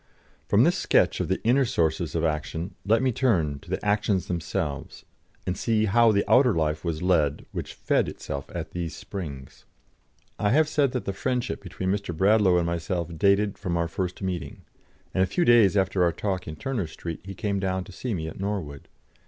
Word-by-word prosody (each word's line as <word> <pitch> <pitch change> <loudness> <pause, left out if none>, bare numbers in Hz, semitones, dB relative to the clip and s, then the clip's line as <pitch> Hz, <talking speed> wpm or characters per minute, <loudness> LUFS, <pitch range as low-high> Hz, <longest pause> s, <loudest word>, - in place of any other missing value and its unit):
From - - +5
this - - +3
sketch - - +3
of - - -1
the 95 - 0
inner 125 +4 +4
sources 85 -7 0
of 80 - 0
action 80 +3 -2
let 115 +5 +3
me 130 - +3
turn 85 - +1
to 85 - -17
the 95 +3 -3
actions 105 -3 +1
themselves, 85 -4 -4 0.4
and 90 - -1
see 110 0 +1
how 115 +2 +5
the 100 -1 +2
outer 125 -4 +5
life 75 -1 0
was 85 -1 -3
led 80 -6 +2
which - - -6
fed - - +1
itself 70 0 -6
at 85 -3 -5
these 85 -3 -4
springs. 70 -11 -8 0.7
I 105 - +2
have 155 +2 +4
said 145 -4 +1
that 125 - -2
the 100 - -2
friendship 125 +2 -2
between 95 0 -3
Mr. 100 -5 -3
Bradlaugh 100 -1 +4
and 85 - +1
myself 85 0 -2
dated 100 +3 +2
from 90 -4 -2
our 85 0 0
first 90 +3 -4
meeting, 90 -4 -4 0.5
and 95 - +1
a 95 - +3
few 170 - +1
days 110 -5 +6
after 95 -1 +1
our 85 - +3
talk 95 +2 -3
in 80 - -5
Turner 115 - -3
Street 80 +1 -6
he 95 0 -8
came 100 +1 -1
down 95 -1 -1
to 100 - -13
see 115 +4 -3
me 80 -2 -4
at 80 - -8
Norwood. 95 -9 -4
95 Hz, 200 wpm, -26 LUFS, 85-105 Hz, 0.7 s, days